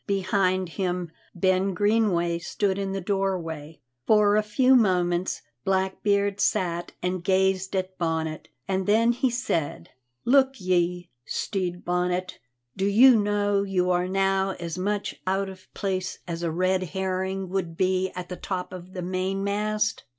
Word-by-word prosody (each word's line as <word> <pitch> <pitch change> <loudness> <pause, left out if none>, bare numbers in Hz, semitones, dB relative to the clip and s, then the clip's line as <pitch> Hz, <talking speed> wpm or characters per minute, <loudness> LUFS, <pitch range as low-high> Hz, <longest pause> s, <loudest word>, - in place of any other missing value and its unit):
Behind 190 -1 +1
him 180 -1 -3 0.2
Ben 185 +1 +1
Greenway 200 -5 +2
stood 190 +3 -1
in 195 -1 -2
the 195 - -2
doorway. 175 -6 -3 0.3
For 210 -1 +5
a 215 - +4
few 255 +5 +3
moments 180 -5 +2 0.2
Blackbeard 200 +2 +1
sat 175 -5 0
and 180 -1 -1
gazed 190 0 +1
at 185 -1 -3
Bonnet, 160 -2 -2 0.2
and 190 0 -1
then 225 +3 +4
he 250 +2 +1
said: 170 - -2 0.3
"Look 270 0 +4
ye, 180 -1 0
Stede 180 -3 -3
Bonnet, 180 +1 -1 0.4
do 195 - -1
you 240 +5 +7
know 205 -1 +1
you 185 -2 0
are 180 0 +1
now 195 0 +1
as 170 -1 -4
much 205 +2 -2
out 195 +1 0
of 185 -1 -13
place 185 -2 -2
as 170 -1 -4
a 170 - 0
red 185 +3 +1
herring 190 +2 -2
would 175 -3 -3
be 185 0 +1
at 180 -1 -5
the 180 - -6
top 185 -2 -4
of 185 0 -9
the 180 - -5
mainmast?" 200 +4 -1
190 Hz, 145 wpm, -26 LUFS, 180-200 Hz, 0.4 s, you